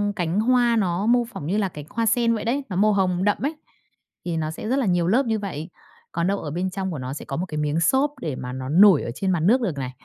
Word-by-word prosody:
cánh 175 0 -1
hoa 240 +1 +3
nó 190 -3 0
mô 240 +1 +4
phỏng 225 -10 -8
như 195 +5 0
là 200 -3 0
cánh 150 -4 -9
hoa 230 +1 -1
sen 230 +1 +2
vậy 215 - -4
đấy, 270 +5 0
nó 185 - -4
màu 210 +3 +3
hồng 185 -2 +1
đậm 205 0 +2
ấ, 280 - +2 0.8
thì 170 -2 -2
nó 155 -1 -2
sẽ 160 - -7
rất 265 +3 +2
là 265 - 0
nhiều 175 -3 +1
lớp 245 +9 +3
như 220 -2 0
vậy. 175 -5 -5 0.4
Còn 170 +1 -1
đâu 200 +1 0
ở 150 - -6
bên 180 +4 -2
trong 190 0 -4
của 155 - -5
nó 130 +1 -5
sẽ 145 - -8
có 135 - -4
một 180 - -2
cái 155 -4 -6
miếng 150 +1 0
xốp 270 +10 +2
để 150 -5 -3
mà 125 0 -6
nó 130 0 -5
nổi 185 +1 +6
ở - - -4
trên 190 +4 -1
mặt 175 - +1
nước 220 +11 +3
được 180 -11 -2
này. 130 -2 -4
190 Hz, 295 wpm, -23 LUFS, 160-225 Hz, 0.8 s, nổi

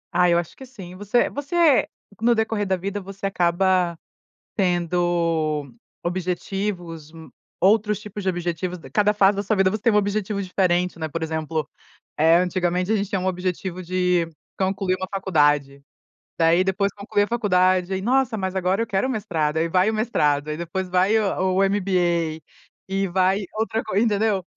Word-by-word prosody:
Ah, 180 0 +4
eu 170 - +4
acho 170 -2 -4
que 265 - -10
sim. 195 -9 -11
Você 205 +5 +1
você 290 +1 +2 0.3
no 235 +1 +4
decorrer 220 -2 -1
da 190 - +2
vida, 200 +3 -4
você 195 0 -8
acaba 180 -1 +1 0.6
tendo 170 -5 0 0.3
objetivos, 175 -2 -4 0.5
outros 210 +1 +3
tipos 210 -1 -7
de 190 - +1
objetivos, 175 0 -3
cada 210 0 +3
fase 200 -1 +3
da 200 - -1
sua 205 +2 0
vida, 190 -1 +3
você 210 +1 -4
tem 230 - +3
um - - +3
objetivo 205 0 0
diferente, 180 -2 0
né. 160 - -2
Por 165 +2 -5
exemplo, 160 -1 -2 0.5
eh, 160 +2 +5
antigamente 180 +1 0
a 220 - +3
gente 200 -1 -2
tinha 195 - 0
um 185 - -3
objetivo 185 0 -3
de 180 -1 +1 0.3
concluir 190 -1 0
uma 185 0 -4
faculdade, 145 -7 +1 0.6
daí 165 +2 +4
depois 195 +1 0
conclui 205 0 0
a - - -2
faculdade, 185 -5 +2
aí 190 - -2
"Nossa, 250 +1 +1
mas 190 -2 -3
agora 190 +3 +1
eu 230 - -1
quero 195 +3 0
mestrado", 165 -10 -1
aí 165 +1 +1
vai 185 +4 +3
o - - -5
mestrado, 150 -10 +1
aí 150 - -3
depois 180 +2 -4
vai 185 +4 +3
o 190 -3 0
o 195 - +4
MBA, 175 -5 0 0.5
e 195 0 0
vai 185 +2 +2
outra 220 +1 -1
co - - -5
entendeu. 210 -2 +2
185 Hz, 170 wpm, -23 LUFS, 175-205 Hz, 0.6 s, eh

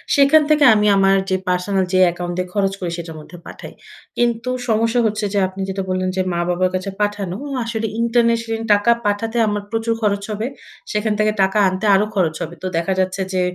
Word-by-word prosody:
সেখান 280 +2 +6
থেকে 305 -1 +4
আমি 210 -1 +2
আমার 195 0 +4
যে, 190 - +2
পার্সোনাল 185 +2 0
যে, 185 - +4
অ্যাকাউন্টে 175 +1 -3
খরচ 195 -2 0
করি, 175 -2 -3
সেটার 165 -2 -7
মধ্যে 165 +3 -12
পাঠাই। - - -10 0.4
কিন্তু 235 0 0 0.2
সমস্যা 230 +2 +2
হচ্ছে 215 -1 -1
যে, 205 - +2
আপনি 190 +1 -8
যেটা 195 0 -3
বললেন 185 0 -1
যে, 190 - +1
মা-বাবার 175 +1 0
কাছে 185 +1 -3
পাঠানো। 205 -3 -2 0.2
আ - - -2
আসলে 225 -1 -2
ইন্টারন্যাশনাল 230 -1 +1
টাকা 205 +3 +3
পাঠাতে 220 +3 -1
আমার 205 0 -1
প্রচুর 225 0 0
খরচ 200 -2 0
হবে। 215 +3 -3 0.4
সেখান 210 0 0
থেকে 215 0 +3
টাকা 195 +2 +2
আনতে 185 +2 -2
আরো 200 +2 +3
খরচ 170 -5 +1
হবে। 165 +2 -7
তো - - -1
দেখা 170 +3 0
যাচ্ছে 185 +1 -1
যে, 185 - +1
205 Hz, 195 wpm, -19 LUFS, 185-225 Hz, 0.4 s, সেখান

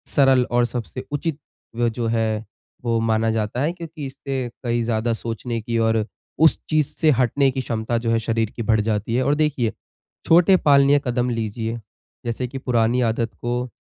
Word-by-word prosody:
सरल 135 -2 +5
और 120 0 +3
सबसे 120 +1 -5
उचित 145 +1 -2 0.4
वो 120 0 +1
जो 115 0 -3
है 110 -1 0 0.4
वो 115 -2 +1
माना 115 0 +1
जाता 110 +2 -1
है 150 +4 +1
क्योंकि 160 -4 -8
इससे 135 -2 -4
कई 120 -1 0
ज़्यादा 115 0 0
सोचने 115 +1 -4
की 115 +2 -2
और 110 -1 +2 0.4
उस 160 - +5
चीज़ 155 -2 +2
से 160 - +3
हटने 135 +2 +3
की 130 - -2
क्षमता 115 -1 -2
जो 115 0 -2
है 115 - +3
शरीर 115 -1 -1
की - - -4
बढ़ 110 -1 +2
जाती 110 +1 -1
है। 130 - +2
और 145 +3 +2
देखिए 145 -7 +1 0.5
छोटे 175 +3 +6
पालनीय 140 -2 +5
कदम 125 0 0
लीजिए। 115 0 -3 0.5
जैसे 120 +2 -2
कि 135 +2 -7
पुरानी 120 -1 +1
आदत 115 -1 0
को 120 +1 -2
120 Hz, 180 wpm, -22 LUFS, 115-135 Hz, 0.5 s, छोटे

